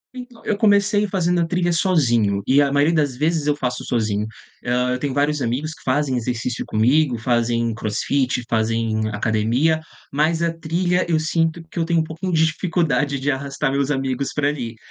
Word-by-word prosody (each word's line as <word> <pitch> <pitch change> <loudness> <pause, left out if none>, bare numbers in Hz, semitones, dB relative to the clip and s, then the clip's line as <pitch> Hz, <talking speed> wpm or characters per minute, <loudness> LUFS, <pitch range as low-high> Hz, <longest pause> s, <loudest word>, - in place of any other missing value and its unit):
Então, 245 -2 -10
eu 210 - +1
comecei 205 -1 +3
fazendo 180 -2 +1
a - - +2
trilha 175 0 0
sozinho 120 - +2
e 140 +2 +4
a 140 - +2
maioria 145 +4 +3
das 145 -5 0
vezes 155 0 0
eu 145 - +2
faço 125 -3 -3
sozinho. 110 -3 -1 0.4
Hã, 125 +1 0
eu 125 - -2
tenho 140 -1 -2
vários 145 +1 +1
amigos 140 +7 -2
que - - -17
fazem 135 0 0
exercício 120 0 -2
comigo, 125 +4 +2
fazem 115 0 0
crossfit, 125 +4 -1
fazem 110 -1 0
academia, 115 +9 +1 0.3
mas 160 +4 +1
a 165 0 0
trilha 175 +2 0
eu 160 - +2
sinto 165 +1 0
que 170 - -6
eu - - +2
tenho 170 -1 +2
um - - -1
pouquinho 165 +4 -5
de 160 -1 +3
dificuldade 155 -5 0
de 145 +2 0
arrastar 135 +1 -2
meus 140 0 0
amigos 135 -1 -1
pra 145 -1 +2
ali. 125 -6 -4
145 Hz, 185 wpm, -21 LUFS, 120-165 Hz, 0.4 s, e